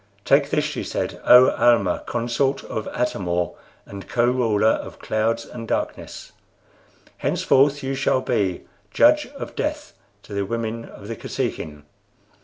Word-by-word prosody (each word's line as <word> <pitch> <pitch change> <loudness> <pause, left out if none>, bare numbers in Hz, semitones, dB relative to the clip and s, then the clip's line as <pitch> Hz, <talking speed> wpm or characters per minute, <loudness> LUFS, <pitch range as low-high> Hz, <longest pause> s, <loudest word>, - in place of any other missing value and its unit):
"Take 140 +1 +4
this," 150 0 +1
she 150 - -3
said, - - -4
"O 125 +1 +8
Almah, 115 -7 +2
consort 120 +4 -1
of 110 - -5
Atam 115 -7 -2
or, 85 0 0 0.3
and 100 -1 -10
Co 120 0 +2
ruler 115 -4 +2
of - - -3
Clouds 115 +1 -1
and 115 -2 -9
Darkness. - - -4 0.9
Henceforth 140 +1 +2
you 135 +1 -2
shall 135 -1 +1
be 100 -9 -1 0.3
Judge - - +4
of - - -7
Death - - -3 0.3
to - - -11
the 100 0 -1
women 115 +2 -3
of 100 - -12
the 115 - -4
Kosekin." 75 -7 -4
115 Hz, 145 wpm, -22 LUFS, 105-130 Hz, 0.9 s, O